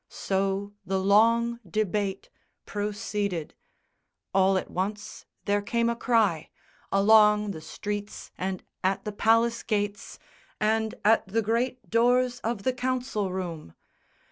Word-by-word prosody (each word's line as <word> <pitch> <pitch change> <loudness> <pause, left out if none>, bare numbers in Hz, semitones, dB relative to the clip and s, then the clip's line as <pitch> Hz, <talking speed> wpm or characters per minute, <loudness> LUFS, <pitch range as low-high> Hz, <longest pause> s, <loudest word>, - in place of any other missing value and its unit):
So 195 +1 -2
the 190 +1 -1
long 230 +4 +3
debate 200 +1 -2 0.3
Proceeded. 205 -4 -3 0.8
All 190 0 +4
at - - -4
once 205 +3 -4 0.2
there 205 0 +1
came 235 +3 0
a - - -2
cry 220 -10 +1 0.4
Along 210 +1 +5
the 160 - -7
streets 205 +5 -6
and 185 0 -4 0.2
at 190 +1 0
the 210 - -2
palace 230 +3 +2
gates 205 -2 -3 0.4
And 220 0 +1
at 220 -1 +4
the 220 +4 0
great 235 +1 -1
doors 245 +2 +3
of 225 -3 -3
the 260 - +1
Council 250 -6 -2
room! 170 - -5
210 Hz, 120 wpm, -27 LUFS, 195-230 Hz, 0.8 s, Along